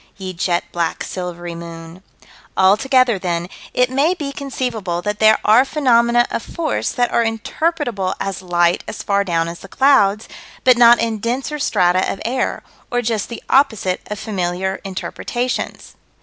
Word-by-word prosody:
Ye 190 -1 -6
jet 175 0 0
black 170 -1 -2
silvery 175 -2 -6
moon. 170 +1 -9 0.6
Altogether, 235 +3 +4
then, 175 -2 -2 0.2
it 250 0 +1
may 290 +7 +2
be 290 -5 -4
conceivable 240 -11 -3
that 210 0 -2
there 220 0 +6
are 220 +4 +6
phenomena 240 -4 +3
of - - -2
force 320 +3 -2
that 245 -1 0
are 235 - +2
interpretable 225 - -2
as 195 -2 -3
light 175 -1 +1
as - - -6
far 200 0 +1
down 165 -3 0
as 170 +1 -7
the - - -11
clouds, 215 -4 +3 0.4
but 255 -1 +6
not 240 0 +7
in 225 -2 -1
denser 260 +7 -2
strata 185 -8 +2
of - - -6
air, 255 +3 -1 0.3
or 245 0 -1
just 220 -3 -1
the 235 - -8
opposite 220 -9 +2
of 210 - -4
familiar 190 -2 -3
interpretations. 240 +6 -4
215 Hz, 155 wpm, -19 LUFS, 185-250 Hz, 0.6 s, not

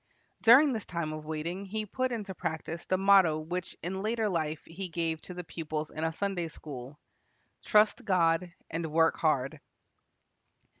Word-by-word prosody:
During 260 +5 +7
this 220 -3 -4
time 170 -3 -3
of 155 0 -7
waiting 165 +5 -3
he 215 +2 -3
put 255 +5 -1
into 210 -5 -4
practise 165 -1 -4
the 185 - +1
motto 190 -5 +5
which 175 +3 -5
in 190 +3 -3
later 220 0 0
life 155 -4 -2
he 180 +3 -6
gave 165 -1 -2
to 180 - -9
the 180 - -5
pupils 155 -2 -4
in 155 - -4
a 160 - +1
Sunday 180 0 -2
school, 140 -3 -9 0.7
"Trust 210 0 +4
God 175 -2 +2 0.2
and 165 -1 -3
work 165 +1 +3
hard." 145 -1 0
170 Hz, 160 wpm, -30 LUFS, 155-195 Hz, 0.7 s, During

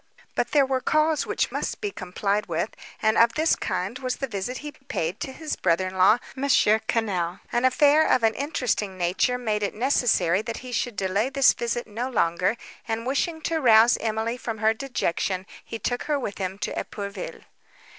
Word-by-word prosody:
But - - 0
there 285 -2 +4
were 260 -1 -1
calls 310 +1 +2
which - - 0
must - - -3
be 415 -2 -3
complied 200 - -2
with, 170 +5 -2 0.3
and 220 0 +3
of 230 0 +5
this 315 +1 +3
kind 185 +7 -3
was 255 -1 -2
the 270 - -3
visit 240 +1 -4
he 295 - -4
paid 215 - -4
to 265 - -4
his 310 +3 -4
brother 180 +1 +1
in 185 - -11
law 190 +4 +6 0.2
M. 270 +1 -3
Quesnel. 210 -6 +2
An 240 +2 +1
affair 290 +4 +5
of 250 - +3
an 225 0 +4
interesting 245 -9 -2
nature 185 +8 +1
made 215 -4 -1
it 200 - -2
necessary 210 -7 +2
that 225 +1 -5
he 250 - -7
should 235 0 -2
delay 200 +5 0
this 275 0 +5
visit 240 0 -2
no 230 +4 -4
longer, 180 -1 +1 0.3
and, 225 0 -2
wishing 320 +5 -1
to 320 +1 -1
rouse 230 -1 +6
Emily 225 +2 -2
from 225 -2 -5
her 220 +1 +3
dejection, 195 -7 -2 0.2
he 230 - -6
took 245 +3 -2
her 300 -1 +1
with 210 -6 -5
him 190 0 -3
to - - -3
Epourville. 200 0 -6
225 Hz, 190 wpm, -25 LUFS, 200-260 Hz, 0.3 s, law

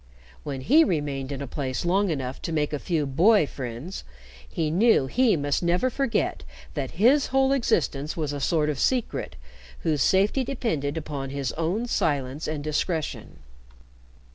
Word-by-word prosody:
When 135 -2 -5
he 300 - +5
remained 145 - -2
in 140 0 -4
a - - -6
place 130 +2 -3
long 195 +3 +2
enough 135 -4 -3
to - - -4
make 150 -2 0
a 145 - -1
few 160 -3 -1
boy 170 +8 +4
friends, 130 +6 -6 0.5
he 155 -2 -1
knew 210 - +4
he 230 - +2
must 145 -1 0
never 180 +9 +1
forget 270 -2 -1 0.3
that - - -4
his 265 +7 +5
whole 270 0 +2
existence 165 - 0
was 150 -3 -2
a 145 - -4
sort 150 +1 +1
of 140 - -5
secret 250 - -1 0.5
whose 150 -4 0
safety 200 - +3
depended 165 - -2
upon 145 -3 -4
his 135 -2 -3
own 175 +9 -1
silence 145 - -1
and 155 -2 -3
discretion. 155 +1 -3
155 Hz, 160 wpm, -25 LUFS, 140-210 Hz, 0.5 s, he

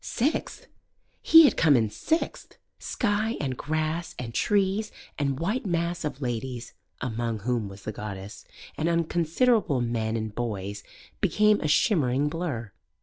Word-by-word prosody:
Sixth! 280 +7 -2 0.6
He 325 0 +9
had 290 - +5
come 150 -5 +5
in 110 -3 +1
sixth! 320 - -2 0.2
Sky 220 +1 -1
and 130 -3 -2
grass 155 +4 -2
and 115 -2 -6
trees 205 - +1 0.3
and 140 -1 0
white 205 +10 -1
mass 170 0 -1
of 145 -2 -4
ladies 120 0 -4 0.3
(among 115 -3 -2
whom 115 -2 -1
was 95 0 -12
the 110 - -4
goddess) 100 0 -7 0.4
and 160 +2 +1
unconsiderable 170 - +2
men 115 -2 -1
and 110 -1 -4
boys 105 -3 -4 0.4
became 210 0 +3
a 155 - 0
shimmering 145 - +2
blur. 150 - -4
145 Hz, 140 wpm, -27 LUFS, 115-175 Hz, 0.6 s, He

